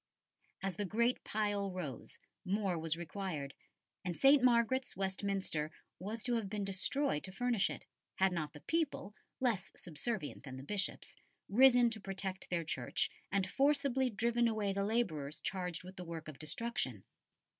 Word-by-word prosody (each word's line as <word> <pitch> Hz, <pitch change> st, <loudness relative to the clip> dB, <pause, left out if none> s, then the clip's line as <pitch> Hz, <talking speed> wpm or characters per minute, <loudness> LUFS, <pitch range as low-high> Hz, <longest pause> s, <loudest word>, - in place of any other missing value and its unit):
As 195 Hz, -3 st, -2 dB
the 205 Hz, -, 0 dB
great 235 Hz, +6 st, +1 dB
pile 205 Hz, -2 st, 0 dB
rose, 165 Hz, -10 st, -5 dB, 0.3 s
more 195 Hz, -1 st, +1 dB
was 165 Hz, -1 st, -1 dB
required, 170 Hz, -5 st, -4 dB, 0.5 s
and 180 Hz, -2 st, -3 dB
St. 275 Hz, -1 st, +7 dB
Margaret's, 250 Hz, -1 st, +3 dB
Westminster, 190 Hz, -5 st, -1 dB, 0.3 s
was 215 Hz, +4 st, -4 dB
to 245 Hz, -, +1 dB
have 210 Hz, -4 st, -2 dB
been 205 Hz, 0 st, -2 dB
destroyed 195 Hz, -, +1 dB
to 185 Hz, -, -3 dB
furnish 235 Hz, 0 st, +2 dB
it, -, -, -6 dB, 0.3 s
had 190 Hz, 0 st, +4 dB
not 155 Hz, -4 st, -2 dB
the 150 Hz, -, -11 dB
people, 315 Hz, -10 st, -1 dB, 0.3 s
less 220 Hz, -8 st, +1 dB
subservient 175 Hz, +1 st, -4 dB
than 130 Hz, -2 st, -8 dB
the 130 Hz, -, -7 dB
Bishops, 200 Hz, +7 st, -1 dB, 0.3 s
risen 245 Hz, +1 st, +7 dB
to 220 Hz, -2 st, -4 dB
protect 190 Hz, -1 st, -4 dB
their 170 Hz, -2 st, 0 dB
church, 130 Hz, -5 st, 0 dB, 0.2 s
and 195 Hz, -1 st, +2 dB
forcibly 275 Hz, +1 st, +3 dB
driven 235 Hz, +2 st, +2 dB
away 215 Hz, -3 st, 0 dB
the 200 Hz, 0 st, 0 dB
labourers 165 Hz, -10 st, 0 dB
charged 180 Hz, -3 st, -3 dB
with 185 Hz, +1 st, -10 dB
the 180 Hz, -, -5 dB
work 165 Hz, -2 st, -6 dB
of 155 Hz, -3 st, -8 dB
destruction. 155 Hz, -, -2 dB
195 Hz, 155 wpm, -35 LUFS, 175-235 Hz, 0.5 s, St